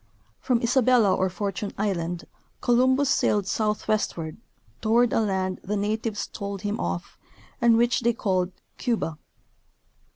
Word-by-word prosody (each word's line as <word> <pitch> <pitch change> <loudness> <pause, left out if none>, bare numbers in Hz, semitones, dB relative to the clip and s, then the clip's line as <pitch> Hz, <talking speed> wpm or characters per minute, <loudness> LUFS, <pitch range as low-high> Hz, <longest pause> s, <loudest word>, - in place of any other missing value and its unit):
From 240 -2 0
Isabella 240 -4 +4
or 190 - +1
Fortune 200 +3 -3
island 175 -4 -2 0.3
Columbus 260 +3 +3
sailed 210 -6 +2
south 210 +1 -1
westward, 170 -7 -1 0.4
toward 230 +2 +3
a - - +3
land 190 -3 -1
the 210 +2 -2
natives 210 +1 -1
told 200 -1 -6
him 205 0 -2
of, 85 0 -4 0.4
and 235 -1 +5
which 240 +1 +3
they 235 0 +2
called 185 -4 0 0.2
" - - -45
Cuba." 215 -11 -1
210 Hz, 135 wpm, -25 LUFS, 190-235 Hz, 0.4 s, and